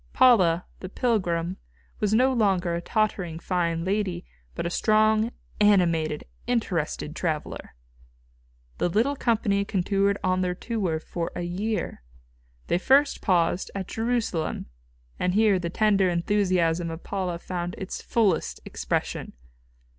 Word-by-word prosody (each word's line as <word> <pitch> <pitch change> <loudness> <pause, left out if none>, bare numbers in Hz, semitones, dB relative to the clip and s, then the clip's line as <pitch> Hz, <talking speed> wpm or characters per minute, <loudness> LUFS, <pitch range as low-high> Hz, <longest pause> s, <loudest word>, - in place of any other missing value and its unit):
Paula, 185 -10 +5
the 185 - -7
pilgrim, 185 -7 0 0.4
was 210 -1 +1
no 255 +4 +4
longer 190 -7 +1
a 170 - -2
tottering 195 -5 -1
fine 170 -1 -1
lady, 195 - -1 0.3
but - - -3
a 170 - -1
strong, 215 +2 +3 0.3
animated, 170 -7 +3 0.2
interested 175 -10 -1
traveller. 155 - -3 1.0
The - - +1
little 230 +10 +1
company 215 -6 +1
continued 200 0 +1
on 185 0 +1
their 180 -1 0
tour 190 -7 -2
for 165 +1 -4
a - - -3
year. 195 - -3 0.6
They 175 - +1
first 280 +7 +3
paused, 175 -1 +1
at 195 -2 -3
Jerusalem, 225 -8 -1 0.5
and 180 +1 0
here 210 -3 +4
the 170 -1 -3
tender, 200 -1 +3
enthusiasm 175 -2 +1
of 165 +1 -7
Paula 185 -3 -2
found 175 0 -4
its 190 - -5
fullest 205 -8 +1
expression. - - -3
185 Hz, 125 wpm, -26 LUFS, 170-215 Hz, 1.0 s, Paula